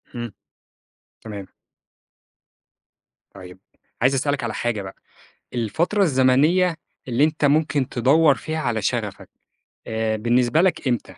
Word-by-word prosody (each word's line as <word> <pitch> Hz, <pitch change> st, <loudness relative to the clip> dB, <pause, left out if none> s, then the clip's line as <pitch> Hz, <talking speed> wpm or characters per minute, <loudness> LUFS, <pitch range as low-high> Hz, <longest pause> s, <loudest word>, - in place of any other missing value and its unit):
إمم. 120 Hz, -2 st, -5 dB, 0.9 s
تمام. 100 Hz, -3 st, -8 dB, 1.9 s
طيب 95 Hz, -1 st, -12 dB, 0.4 s
عايز 130 Hz, +3 st, +4 dB
أسألك 140 Hz, -1 st, -1 dB
على 115 Hz, -2 st, -3 dB
حاجة 120 Hz, -4 st, -2 dB
بقى، 95 Hz, 0 st, -9 dB, 0.6 s
الفترة 165 Hz, -, 0 dB
الزمنية 155 Hz, +4 st, +3 dB, 0.3 s
اللي 125 Hz, +4 st, +3 dB
أنت 155 Hz, -1 st, -1 dB
ممكن 145 Hz, -2 st, +2 dB
تدوّر 140 Hz, +4 st, +4 dB
فيها 155 Hz, +2 st, -5 dB
على 115 Hz, -8 st, -1 dB
شَغَفك، -, -, -3 dB, 0.6 s
آآ 110 Hz, -1 st, -1 dB
بالنسبة 120 Hz, +6 st, +2 dB
لك 180 Hz, -6 st, +1 dB
إمتى؟ 120 Hz, -3 st, 0 dB
130 Hz, 115 wpm, -22 LUFS, 115-155 Hz, 1.9 s, عايز